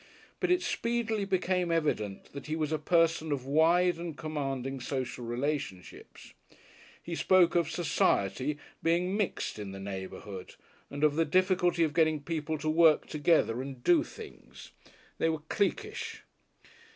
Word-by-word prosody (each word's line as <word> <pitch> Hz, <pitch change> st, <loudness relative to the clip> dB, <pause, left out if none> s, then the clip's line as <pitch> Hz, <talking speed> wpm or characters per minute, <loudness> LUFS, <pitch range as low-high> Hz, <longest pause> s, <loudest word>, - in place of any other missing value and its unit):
But -, -, 0 dB
it 360 Hz, 0 st, +3 dB
speedily 230 Hz, -3 st, -1 dB
became 185 Hz, -2 st, 0 dB
evident 145 Hz, -12 st, -1 dB
that 140 Hz, 0 st, -8 dB
he 155 Hz, -, -1 dB
was 155 Hz, -1 st, -2 dB
a 155 Hz, -, 0 dB
person 165 Hz, 0 st, +2 dB
of 135 Hz, -3 st, -2 dB
wide 165 Hz, +5 st, +3 dB
and 170 Hz, -3 st, -6 dB
commanding 135 Hz, -4 st, -3 dB
social 125 Hz, -1 st, -4 dB
relationships. 125 Hz, -5 st, -5 dB, 0.7 s
He 170 Hz, -, -6 dB
spoke 175 Hz, 0 st, +4 dB
of 170 Hz, -3 st, +2 dB
"society" 140 Hz, -, +1 dB, 0.2 s
being 175 Hz, +3 st, +1 dB
mixed 205 Hz, -, -2 dB
in 100 Hz, -2 st, -6 dB
the 95 Hz, -, -7 dB
neighbourhood 95 Hz, 0 st, -7 dB, 0.3 s
and 145 Hz, +1 st, -5 dB
of 150 Hz, 0 st, +3 dB
the 165 Hz, -, +4 dB
difficulty 180 Hz, +1 st, +2 dB
of 155 Hz, -2 st, 0 dB
getting 160 Hz, -1 st, +3 dB
people 160 Hz, -1 st, -2 dB
to 155 Hz, +1 st, -5 dB
work 160 Hz, 0 st, +5 dB
together, 145 Hz, -6 st, +2 dB
and 135 Hz, -2 st, -8 dB
"do" 325 Hz, -3 st, +5 dB
things; 440 Hz, -3 st, -12 dB, 0.5 s
they 165 Hz, -, +2 dB
were 160 Hz, -2 st, -2 dB
cliquish. 425 Hz, -, -2 dB
160 Hz, 145 wpm, -30 LUFS, 135-180 Hz, 0.7 s, work